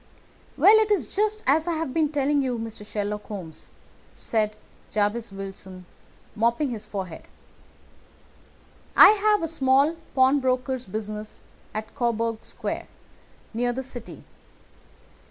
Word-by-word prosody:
"Well, 430 +2 +8
it 435 -1 +2
is 350 - 0
just 430 +1 0
as 315 +4 +3
I 345 - +1
have 320 -5 -3
been 315 -2 +2
telling 285 0 +2
you, 255 -3 -1
Mr. 225 -2 -7
Sherlock 210 0 -4
Holmes," 180 -7 -9 0.4
said 215 -2 -1 0.3
Jabez 215 +2 -1
Wilson, 195 -1 -9 0.5
mopping 235 +5 +1
his 215 -2 -6
forehead; 190 -5 -6 1.7
"I - - +11
have 420 -2 +3
a - - 0
small 280 0 +3 0.2
pawnbroker's 260 -1 +2
business 215 +1 -6 0.3
at 215 +1 -6
Coburg 230 -3 -1
Square, - - -5 0.7
near 245 +2 0
the 260 +2 -4
City. 250 -3 -9
240 Hz, 120 wpm, -25 LUFS, 210-290 Hz, 1.7 s, I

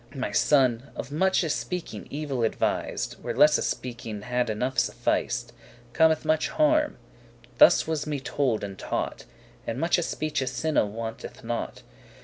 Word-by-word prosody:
My 130 -6 -2
son, 130 +1 +3
of - - -6
muche 185 +2 +2
speaking 165 - -4
evil 140 -4 -2
advis'd, 85 - -1
Where - - -3
lesse 150 0 +5
speaking 115 -4 -5
had 125 0 0
enough 125 +4 -1
suffic'd, - - 0 0.4
Cometh 160 -1 +3
much 155 0 +2
harm; 305 -1 +2 0.6
thus - - +7
was 155 -2 -2
me 145 -2 -2
told 130 -4 -1
and 100 -1 -6
taught; - - -3 0.4
In - - -2
muche - - +2
speeche 150 -4 -2
sinne 130 -5 0
wanteth 115 0 -6
not. 115 0 -4
135 Hz, 135 wpm, -26 LUFS, 115-155 Hz, 0.6 s, thus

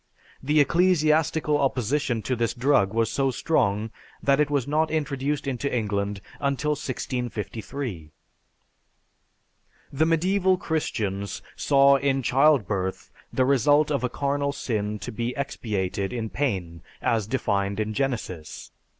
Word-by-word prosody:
The 150 +3 +2
ecclesiastical 155 -2 +3
opposition 135 -2 0
to 130 - -1
this 115 0 -1
drug 120 -6 +3
was 115 0 +1
so 135 -1 +1
strong 110 -6 0 0.3
that 140 0 +3
it 150 -1 +3
was 140 -3 0
not 155 +2 +1
introduced 145 -2 -1
into 140 +1 -2
England 100 -3 -1 0.2
until 140 +1 0
1653. 125 - -4 1.8
The 150 +3 +2
medieval 185 +3 +2
Christians 100 - -2
saw 140 0 +5
in 135 -1 0
childbirth 110 - +2 0.2
the 130 - +2
result 145 +3 +3
of 140 -3 0
a 125 - +1
carnal 140 +2 -1
sin 105 -5 -2
to 95 - -6
be 120 +3 -3
expiated 100 -7 -2
in 115 -3 -3
pain 90 - -2 0.2
as 110 -3 +1
defined 100 -5 -1
in 110 0 -1
Genesis. 110 - -4
130 Hz, 125 wpm, -25 LUFS, 105-145 Hz, 1.8 s, saw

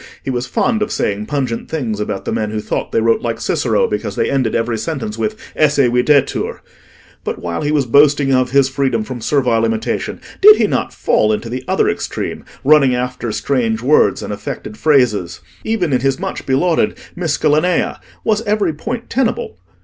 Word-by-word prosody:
He 135 - -2
was 125 0 -2
fond 220 - 0
of 210 - -1
saying 105 +1 -2
pungent 130 -5 -2
things 120 -10 -3
about 105 -2 -3
the - - -2
men 105 -1 -1
who 110 0 -3
thought - - -3
they - - +2
wrote 115 0 +2
like 115 -1 -3
Cicero 475 - +1
because - - -3
they - - 0
ended 130 -5 0
every 115 -1 -1
sentence 165 - -4
with 215 0 -2 0.2
"esse 150 -2 +2
videtur:" 130 +2 +2 0.6
but - - -3
while 85 -1 -4
he 150 - -1
was 145 -3 +2
boasting 140 +2 +4
of 130 -1 +2
his 135 +1 +4
freedom 135 -4 0
from 120 +1 -7
servile 120 -3 +1
imitation, 115 -1 -2 0.2
did 420 +2 +10
he - - +2
not - - -1
fall 105 - +1
into 110 +2 -2
the 125 +1 -4
other - - +2
extreme, - - -3 0.2
running 140 -3 +5
after 125 -2 -3
strange 115 -3 -1
words 145 +4 +3
and - - -4
affected 105 - -6
phrases? 110 - +1 0.2
Even 190 -9 0
in 125 - +2
his 135 0 0
much - - -5
belauded 160 +6 +1 0.2
'Miscellanea' 160 0 +1 0.2
was 215 -1 +1
every 205 -5 +1
point 230 +10 -5
tenable? 270 - -1
135 Hz, 180 wpm, -17 LUFS, 115-155 Hz, 0.6 s, did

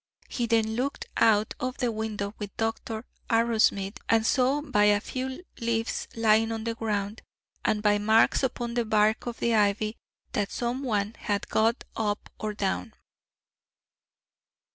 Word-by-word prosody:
He 240 -2 -2
then 220 -1 +2
looked 265 +4 -2
out 215 -2 +3
of 255 -2 -3
the 245 -3 0
window 215 -2 -3
with 205 -2 -7
Dr. 225 0 -2 0.2
Arrowsmith, 225 -4 +2
and 225 -1 +4
saw 260 +4 +3
by 245 -8 +3
a 205 0 +5
few 260 - -5 0.2
leaves 230 -1 -1
lying 225 0 +3
on 225 -1 -3
the 230 0 -1
ground, 210 -2 -2 0.4
and 210 -1 +1
by 205 -1 +4
marks 220 +2 +4
upon 245 -3 -2
the 240 0 +1
bark 215 +2 +2
of 235 - -4
the 235 - +1
ivy, 215 +1 +2 0.3
that 205 -1 -1
some 245 +2 -2
one 215 -5 -1
had 205 -2 -2
got 225 +2 +2
up 210 -2 -2
or 215 -1 -3
down. 205 +3 -2
225 Hz, 150 wpm, -27 LUFS, 210-235 Hz, 0.4 s, a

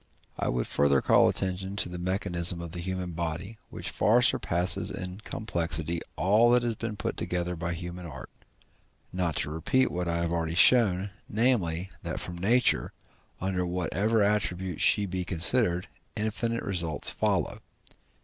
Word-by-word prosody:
I - - -1
would - - -1
further 70 -1 +3
call - - +4
attention 95 +1 -3
to 100 - -1
the 90 0 -7
mechanism 90 -1 -1
of 85 -1 -7
the 90 - -6
human 90 0 -3
body, 85 +6 -5
which - - -6
far 120 +4 +3
surpasses 90 -7 +2
in 90 +1 -6
complexity 85 -6 -2
all 105 +7 +4
that 120 0 +4
has 120 -1 0
been 110 0 -5
put - - -4
together 90 0 -2
by 85 +1 -3
human 85 +1 -7
art, 70 -5 -10 0.8
not 90 -4 -1
to 75 - -1
repeat 105 +12 +1
what 90 0 -3
I 85 0 0
have 85 -1 -1
already 85 -1 -2
shown, 100 -2 +5 0.2
namely, 100 -7 +1
that - - -4
from 85 -1 -6
nature, 120 +7 +2 0.5
under 95 -1 -1
whatever 95 +5 0
attribute 95 -4 -1
she 105 - +4
be 95 -1 -3
considered, 90 +2 +3 0.3
infinite 115 +2 -2
results 85 -5 +1
follow. - - -1
90 Hz, 155 wpm, -28 LUFS, 85-105 Hz, 0.8 s, shown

